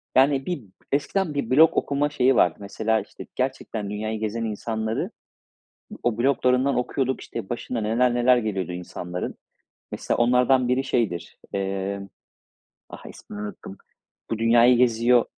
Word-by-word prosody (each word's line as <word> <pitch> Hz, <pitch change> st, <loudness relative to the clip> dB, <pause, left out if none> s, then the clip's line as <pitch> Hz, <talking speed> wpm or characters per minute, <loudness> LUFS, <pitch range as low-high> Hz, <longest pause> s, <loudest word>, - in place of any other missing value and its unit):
yani 135 Hz, 0 st, +4 dB
bir 175 Hz, -9 st, -3 dB, 0.3 s
eskiden 150 Hz, +4 st, 0 dB
bir 145 Hz, -, -2 dB
blog 155 Hz, +5 st, +5 dB
okuma 145 Hz, +1 st, +1 dB
şeyi 130 Hz, -2 st, +3 dB
vardı. 85 Hz, -3 st, +3 dB
Mesela 110 Hz, +2 st, 0 dB
işte 100 Hz, -, -11 dB
gerçekten 125 Hz, -5 st, -3 dB
dünyayı 110 Hz, +1 st, -3 dB
gezen 110 Hz, +1 st, -2 dB
insanları 110 Hz, +1 st, -3 dB, 0.9 s
o 120 Hz, -2 st, 0 dB
bloglarından 130 Hz, +1 st, +2 dB
okuyorduk, 130 Hz, +1 st, -1 dB
işte 95 Hz, -, -7 dB
başına 120 Hz, 0 st, -3 dB
neler 120 Hz, +3 st, +2 dB
neler 125 Hz, +1 st, +4 dB
geliyordu 95 Hz, -5 st, -2 dB
insanların. 90 Hz, 0 st, -5 dB, 0.6 s
Mesela -, -, -2 dB
onlardan 125 Hz, +1 st, +3 dB
biri 125 Hz, +2 st, +1 dB
şeydir, 115 Hz, -10 st, -2 dB, 0.2 s
emm, 100 Hz, 0 st, -3 dB, 0.8 s
ah, -, -, -11 dB
ismini 105 Hz, -, -9 dB
unuttum, 105 Hz, -1 st, -8 dB, 0.5 s
bu 115 Hz, -, -1 dB
dünyayı 120 Hz, +2 st, +5 dB
geziyor. 120 Hz, 0 st, +4 dB
120 Hz, 130 wpm, -24 LUFS, 105-130 Hz, 0.9 s, blog